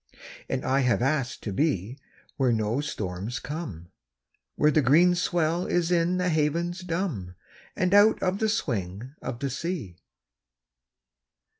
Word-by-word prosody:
And 130 - -2
I 135 +1 +2
have 125 -2 +2
asked 135 -3 -1
to 105 - -3
be 125 - 0 0.4
Where 130 -3 +2
no 110 +3 0
storms 105 -3 -4
come, 110 - -6 0.6
Where 150 - +4
the 155 - +3
green 160 +7 +5
swell 175 -1 0
is 175 0 +1
in 175 +1 +2
the 180 0 +1
havens 170 +3 0
dumb, 165 - -3 0.4
And 185 +1 +1
out 205 +2 +6
of 185 +2 0
the 220 - +1
swing 115 - -3
of 115 - -4
the 135 +1 -3
sea. 140 - -4
150 Hz, 140 wpm, -26 LUFS, 115-175 Hz, 0.6 s, out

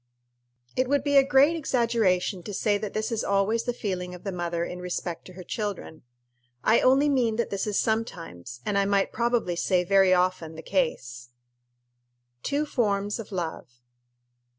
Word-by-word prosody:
It 255 0 +1
would 280 0 +1
be 285 0 +1
a 275 - +8
great 275 +4 +4
exaggeration 230 - +1
to 200 +3 -7
say 205 0 +1
that 210 -1 -5
this 215 +2 -1
is 225 -1 -1
always 200 +3 +1
the 245 - 0
feeling 185 -6 -4
of 180 - -13
the 195 - -3
mother 170 -1 -2
in 180 - -7
respect 180 -1 -4
to 185 - -12
her 185 0 -9
children. 200 -5 -5 0.6
I 220 - +5
only 270 +3 +4
mean 250 -6 +2
that 235 - -2
this 200 +1 -2
is 210 - 0
sometimes, 165 - -3
and 200 -1 +1
I 200 - +2
might 200 -1 +1
probably 235 -6 0
say 180 +1 +1
very 195 0 +4
often, 180 -3 +1
the 160 - -9
case. 125 - -2 1.1
_Two 290 +2 0
Forms 205 -5 0
of 225 - -8
Love. 160 -9 -5
200 Hz, 175 wpm, -26 LUFS, 180-235 Hz, 1.1 s, a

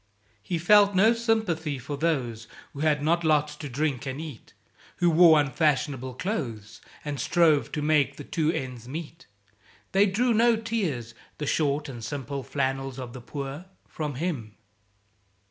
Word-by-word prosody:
He 170 - -2
felt 200 +3 +5
no 215 +5 +5
sympathy 215 - 0
for 140 +3 -5
those 130 -8 -1 0.3
Who 140 - -9
had 150 -1 +1
not 170 +3 +2
lots 150 -1 +2
to 150 -2 -6
drink 140 +1 -2
and 130 +2 -4
eat, 155 -8 -9 0.4
Who 175 -1 +3
wore 160 -1 +7
unfashionable 140 -3 0
clothes, 120 - -4 0.2
And 145 -2 -3
strove 160 -5 +3
to 150 - -2
make 150 -2 +2
the 145 - -8
two 160 +1 0
ends 125 -5 -5
meet; 160 +4 -8 0.6
(They 195 +2 +4
drew 235 +5 +2
no 230 +1 +4
tears, 190 - -3 0.2
"the 150 - -3
short 145 0 0
and 120 -4 -8
sim 135 +3 -4
Ple 140 +1 -4
flannels 135 -1 -2
of 125 -2 -7
the 130 - -8
Poor," 140 +5 -6 0.2
from 150 -3 -4
him.) 130 - -3
150 Hz, 160 wpm, -26 LUFS, 135-170 Hz, 0.6 s, wore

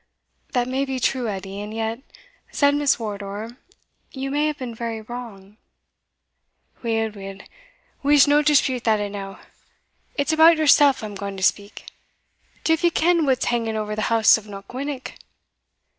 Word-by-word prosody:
"That 245 -2 +1
may 260 +2 -1
be 265 -1 -3
true, 250 -1 0
Edie, 195 0 -6
and 210 +1 -7
yet," 225 +1 -3 0.5
said 285 0 +3
Miss 290 -1 +2
Wardour, 210 +1 -6 0.6
"you 270 0 -5
may 295 +2 +1
have 300 -1 -3
been 250 -3 -6
very 230 0 -4
wrong." 215 -3 -10 1.2
"Weel, 225 -2 -1
weel, 195 -1 -9 0.6
we'se 285 0 +5
no 290 +1 +4
dispute 280 -4 +2
that 220 -2 +3
e'ennow 200 -1 -5 0.8
it's 285 +1 0
about 320 +1 +6
yoursell 290 -2 +5
I'm 210 -1 -6
gaun 200 0 -6
to 190 - -5
speak. 200 +2 -1 0.8
Div 325 +1 +1
ye 345 - +5
ken 335 -1 +2
what's 260 -2 +1
hanging 230 -2 -1
ower 210 0 -3
the 215 - -3
house 225 -1 +5
of 215 - -16
Knockwinnock?" 250 +7 -6
235 Hz, 150 wpm, -22 LUFS, 210-280 Hz, 1.2 s, about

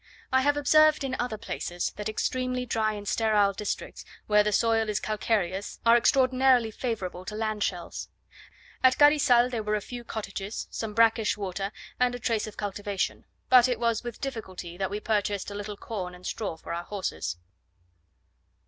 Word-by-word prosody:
I 260 - +5
have 290 +2 +2
observed 310 +1 +5
in 260 -1 -2
other 245 -3 -2
places 175 -5 -3
that 210 +1 -4
extremely 255 +3 -1
dry 220 -2 0
and 205 -1 -7
sterile 210 -3 +3
districts, 205 +2 -4 0.2
where 210 0 +5
the 210 - 0
soil 225 +1 +2
is 210 - 0
calcareous, 205 -3 -1
are 230 0 +7
extraordinarily 255 -1 +4
favourable 205 -7 -4
to 210 - -6
land 215 -1 -2
shells. 180 -4 -3 0.7
At 260 0 +5
Carizal 290 -5 +6
there 235 -3 -2
were 210 0 0
a - - 0
few 240 +3 -8
cottages, 205 -2 -5
some 215 -2 -4
brackish 225 -1 +3
water, 195 0 -3 0.3
and 250 0 +2
a - - -6
trace 225 -3 0
of 215 - -10
cultivation: 205 -1 -3 0.2
but 255 -1 +7
it 245 -3 -1
was 230 -1 +1
with 240 -1 -6
difficulty 190 -10 -6
that 190 +1 -2
we 205 - -3
purchased 205 -2 -1
a - - -5
little 205 0 -6
corn 185 -6 -5
and 180 +1 -15
straw 195 -7 -3
for 165 - -7
our 170 +1 -4
horses. 90 - -3
215 Hz, 175 wpm, -27 LUFS, 200-245 Hz, 0.7 s, are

